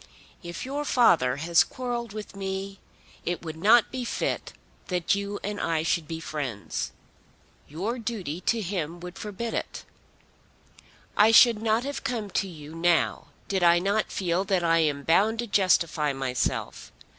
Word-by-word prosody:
"If 170 +3 -6
your 285 +3 -3
father 170 - +4
has 165 +4 +4
quarrelled 240 -3 -4
with 210 -1 -8
me, 195 0 -4 0.4
it 175 0 -3
would 160 -1 -5
not 220 +8 +5
be 255 -1 -3
fit 235 - -2 0.4
that 180 -1 +1
you 200 0 -3
and 205 +1 -3
I 160 -1 0
should 165 -1 0
be 160 -1 -5
friends. 140 -10 -4 0.8
Your 200 - -3
duty 195 -8 -4
to 230 -1 +2
him 175 -4 -3
would 180 0 -8
forbid 215 +2 -5
it. - - -4 1.3
I 210 +2 +6
should 225 -1 +7
not 225 +1 +1
have 280 +1 -4
come 230 -7 -3
to 195 - 0
you 155 -3 -10
now 170 0 +1 0.2
did 190 -2 0
I 170 0 +6
not 200 +4 0
feel 180 0 0
that 190 -3 +1
I 165 0 +3
am 145 -3 +1
bound 205 +8 +3
to 240 - -2
justify 170 -8 +2
myself. 130 -2 -2
190 Hz, 155 wpm, -26 LUFS, 165-220 Hz, 1.3 s, should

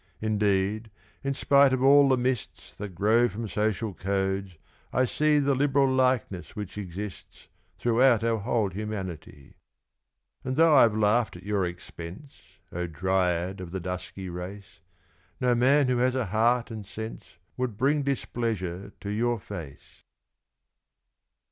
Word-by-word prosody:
Indeed, 105 0 0 0.3
in 140 0 -1
spite 140 -1 +4
of 130 0 0
all 140 +1 +7
the 130 - +4
mists 125 -2 -3
That 100 -3 -7
grow 110 +6 +3
from 110 +3 -5
social 105 0 -1
codes, 95 0 -2 0.4
I 130 +2 +2
see 150 +4 +2
The 140 -1 +2
liberal 135 0 +2
likeness 125 -8 0
which 105 -2 -6
exists 100 0 -8 0.3
Throughout 120 -1 +3
our 115 -1 +1
whole 110 -1 0
humanity. 95 -8 -6 0.9
And 130 0 -2
though 160 0 +5
I've 115 -5 +6
laughed 110 +1 +2
at 90 - -13
your 100 -2 0
expense, 90 - -9 0.4
O 90 0 -3
Dryad 90 +2 0
of 90 - -7
the 95 +2 -4
dusky 90 +1 -6
race, 90 0 -8 0.6
No 125 -1 +2
man 135 +4 +4
who 125 -1 +1
has 125 +1 +2
a 130 -3 0
heart 115 +4 +1
and 110 -2 -6
sense 105 -2 -8 0.2
Would 125 -5 -3
bring 145 +4 +2
displeasure 110 -8 -3
to 100 - -5
your 120 +2 0
face. 75 -7 -10
110 Hz, 140 wpm, -27 LUFS, 95-125 Hz, 0.9 s, all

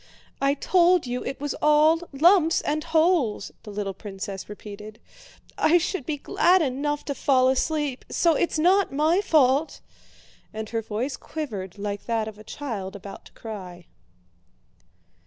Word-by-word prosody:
"I 275 +1 +2
told 355 +2 +3
you 245 0 -3
it 270 - -5
was 290 0 -3
all 305 +2 +4
lumps 330 +3 +4
and 305 +1 -2
holes!" 320 - +1
the - - -11
little 205 -1 -4
princess 195 -1 -7
repeated. 210 +1 -10 0.6
"I 335 +3 +5
should 345 -4 -3
be 305 - -2
glad 355 +5 +3
enough 290 +2 -2
to 285 - -2
fall 260 -2 +3
asleep, 285 0 -1
so 335 -1 +3
it's 335 +2 0
not 370 +5 +3
my 310 +7 +2
fault!" 295 -2 +2 0.7
and 220 0 -6
her 225 -1 -2
voice 225 +6 -3
quivered 210 - -6
like 205 0 -5
that 225 -2 0
of 215 -1 -9
a - - -11
child 215 -6 -6
about 200 0 -10
to - - -15
cry. 185 -6 -9
275 Hz, 150 wpm, -25 LUFS, 215-315 Hz, 0.7 s, I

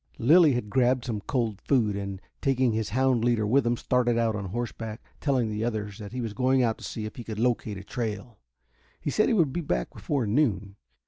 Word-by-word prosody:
Lilly 150 +4 +6
had 120 -3 -2
grabbed 125 0 +2
some 110 -4 -3
cold 115 -3 -2
food, 115 -7 +2
and, 100 -1 -4 0.2
taking 130 -3 +2
his 110 -1 -1
hound 130 +1 +2
leader 120 -3 +2
with 125 +3 +3
him, 120 0 +1
started 120 -1 +1
out 115 -2 +1
on 100 -1 -4
horseback, 115 +2 -4 0.2
telling 130 -6 +1
the 105 +1 -2
others 105 -3 -3
that 105 -2 -8
he 125 +1 -4
was 115 -3 -4
going 130 +3 +2
out 115 -2 0
to - - -12
see 110 - -5
if 110 - -8
he 120 - -6
could 110 -2 -6
locate 115 -3 0
a 95 - -8
trail. 110 0 -5 0.6
He 145 - -3
said 215 - +3
he 235 - +2
would 160 -9 +2
be 175 - -1
back 60 - -2
before 140 -5 -1
noon. 105 -5 0
115 Hz, 220 wpm, -27 LUFS, 105-130 Hz, 0.6 s, Lilly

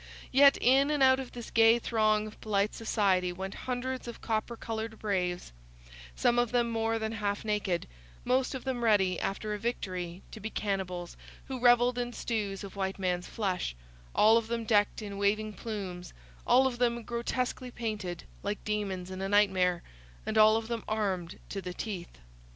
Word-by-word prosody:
Yet 275 +1 +7
in 270 +3 +4
and 295 -2 +2
out 260 0 +6
of 260 -2 -7
this 240 -2 -8
gay 225 +1 +6
throng 215 -2 +2
of 215 - -11
polite 205 -1 +1
society 195 -5 +1
went 190 +2 -5 0.2
hundreds 255 0 -3
of 235 - -7
copper 225 +1 -2
coloured 225 0 -4
braves; 180 - -2 0.6
some 240 - +3
of 240 -2 +1
them 240 -1 +2
more 225 0 0
than 220 0 -2
half 205 -1 -2
naked; 210 -5 0 0.4
most 260 +1 +1
of 260 - -6
them 255 -3 -2
ready, 195 -5 +3
after 210 +2 -2
a 210 - -4
victory, 185 -6 -4
to - - -8
be 215 +2 -4
cannibals 185 -5 -3 0.3
who 260 -1 -5
revelled 245 0 +5
in 245 0 -3
stews 210 -5 -3
of 200 - -8
white 190 -1 -2
man's 180 -2 -1
flesh; 185 - -2 0.4
all 220 +2 +6
of 230 -1 -1
them 230 0 -2
decked 210 0 +2
in 200 -1 -6
waving 215 +1 +1
plumes, 195 -6 -6 0.3
all 260 +2 +6
of 245 -2 -1
them 235 -1 +1
grotesquely 245 +2 -2
painted, 210 -8 -4 0.2
like 205 +1 -3
demons 195 -4 -2
in 185 0 -5
a 195 - -2
nightmare, 190 -4 +3 0.4
and - - -2
all 215 0 +7
of 225 0 -4
them 230 -2 -3
armed 195 -6 -2
to 195 - -5
the 180 -1 -6
teeth. 190 -6 -6
215 Hz, 180 wpm, -30 LUFS, 195-235 Hz, 0.6 s, Yet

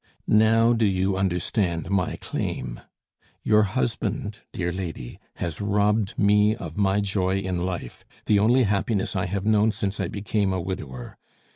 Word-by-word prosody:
"Now, 115 +2 +4
do 115 -2 +2
you 95 0 +1
understand 95 -1 -1
my 100 -3 0
claim? - - -4 0.6
Your 105 0 +4
husband, 110 +1 -2
dear 90 -2 -2
lady, 85 -9 -6 0.2
has 85 -1 -4
robbed 105 0 +1
me 105 +1 +4
of 80 -7 -8
my 100 0 +2
joy 95 -1 0
in 95 -2 -2
life, 85 -9 -6 0.2
the 105 - +4
only 120 +5 +4
happiness 100 0 0
I 90 -1 0
have 100 +1 -3
known 110 0 +4
since 100 -1 -3
I - - 0
became 100 -1 -1
a 95 - -1
widower. 75 -9 -6
100 Hz, 150 wpm, -25 LUFS, 90-105 Hz, 0.6 s, Now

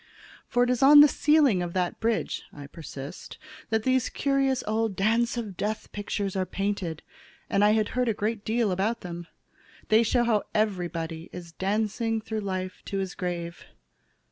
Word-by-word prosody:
"For 245 - +2
it 245 - +1
is 250 - 0
on 290 +2 +9
the 295 - +9
ceiling 285 - +3
of 175 -1 -4
that 180 -2 -1
bridge," 225 0 -1
I 145 - -10
persist, 145 +1 -9 0.3
"that 220 -1 +1
these 260 0 +2
curious 275 -2 +1
old 220 -1 0
Dance 230 +5 +1
of 215 -5 -4
Death 210 +4 -3
pictures 200 -1 -3
are 190 - +1
painted, 185 -3 -3 0.5
and 200 - +3
I 210 +1 +5
had 215 -1 +1
heard 250 -1 0
a - - +2
great 210 0 -2
deal 225 -2 +1
about 205 +6 -1
them. 170 -1 -7 0.6
They 220 +1 +6
show 240 +2 +2
how 225 -3 +2
everybody 175 -6 -2
is 175 -2 -9
dancing 215 +5 -1
through 220 0 -4
life 185 -1 -4
to 195 - -3
his 190 -1 -3
grave. 175 -2 -4
210 Hz, 170 wpm, -27 LUFS, 180-230 Hz, 0.6 s, on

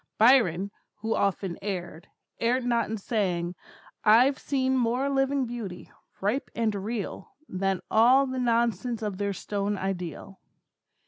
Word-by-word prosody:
Byron, 210 -6 +4 0.3
who 225 +1 0
often 195 -2 -1
erred, 175 -5 -5 0.3
erred 245 +2 +1
not 235 -2 +1
in 220 - -2
saying, 185 -5 -1 0.5
I've 250 +6 +5
seen 265 -2 0
more 255 +3 +1
living 270 0 +1
beauty, 225 -7 -7 0.3
ripe 215 +8 0
and 225 -2 +1
real, 205 +1 -5
than 190 0 -1
all 250 +5 +6
the 260 -1 -3
nonsense 235 -1 0
of 205 -2 -3
their 200 -1 -1
stone 205 +1 -2
ideal. 190 0 -5
220 Hz, 130 wpm, -27 LUFS, 195-245 Hz, 0.5 s, all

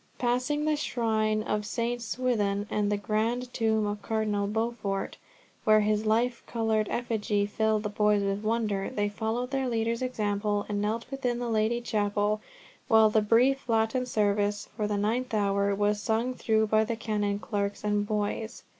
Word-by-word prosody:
Passing 255 +5 0
the 310 0 +2
shrine 220 -6 0
of 210 -1 -1
St. 235 +3 -2
Swithun, 220 -4 0
and 210 -1 +1
the 205 - +1
grand 230 +4 -1
tomb 220 -2 +1
of 205 0 -3
Cardinal 210 -2 -1
Beaufort, 215 -2 -2 0.5
where 215 0 +5
his 215 +1 +1
life 235 +3 +1
coloured 220 -2 0
effigy 215 -4 0
filled 215 +1 0
the 210 - -2
boys 210 0 +2
with 200 +1 -1
wonder, 215 -3 0
they 205 -5 -1
followed 225 +5 -3
their 270 -2 0
leader's 230 0 -1
example, 205 -4 -1
and 205 -1 -2
knelt 220 +3 -1
within 250 -3 -1
the 240 -1 -3
Lady 225 +2 +1
Chapel, 210 -1 0 0.5
while 220 -1 +6
the 220 - +4
brief 245 +5 +2
Latin 225 +3 +1
service 205 -2 0
for 210 -2 -1
the 210 -1 -1
ninth 225 +4 -1
hour 200 -1 +1
was 205 +1 +1
sung 230 +4 0
through 220 -3 +1
by 215 0 +3
the 230 +1 -2
canon, 210 -2 -1
clerks, 200 -1 -3
and 205 0 0
boys. 215 +2 -2
215 Hz, 165 wpm, -28 LUFS, 205-235 Hz, 0.5 s, while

